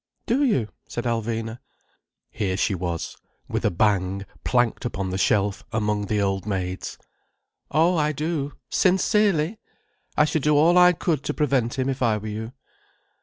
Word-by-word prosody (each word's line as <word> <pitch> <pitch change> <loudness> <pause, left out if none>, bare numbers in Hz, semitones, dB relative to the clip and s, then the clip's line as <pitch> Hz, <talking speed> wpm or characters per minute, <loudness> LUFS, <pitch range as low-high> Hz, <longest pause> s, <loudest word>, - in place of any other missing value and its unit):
"Do 260 +5 +2
you?" 130 - +1 0.2
said 120 - -4
Alvina. 115 -1 -2 0.7
Here 95 -3 -1
she 100 - +1
was, 85 -2 -4 0.3
with - - -2
a - - +3
bang, 100 0 +1 0.2
planked 120 0 +1
upon 95 -6 -3
the 95 - -2
shelf 100 0 +1
among 105 -2 0
the 105 +1 0
old 95 0 -1
maids. 95 -2 -3 0.7
"Oh, 165 +4 +3
I 150 -1 +2
do. 150 -1 -2 0.2
Sincerely! 190 -1 +2 0.6
I 150 - +6
should 155 0 0
do 150 +1 +3
all 165 +4 +5
I 180 0 +7
could 160 -4 -1
to - - -2
prevent 135 -6 +1
him, 130 0 0
if 135 -1 -2
I 115 -3 +3
were 105 - -8
you." 110 +2 -5
120 Hz, 160 wpm, -24 LUFS, 100-150 Hz, 0.7 s, I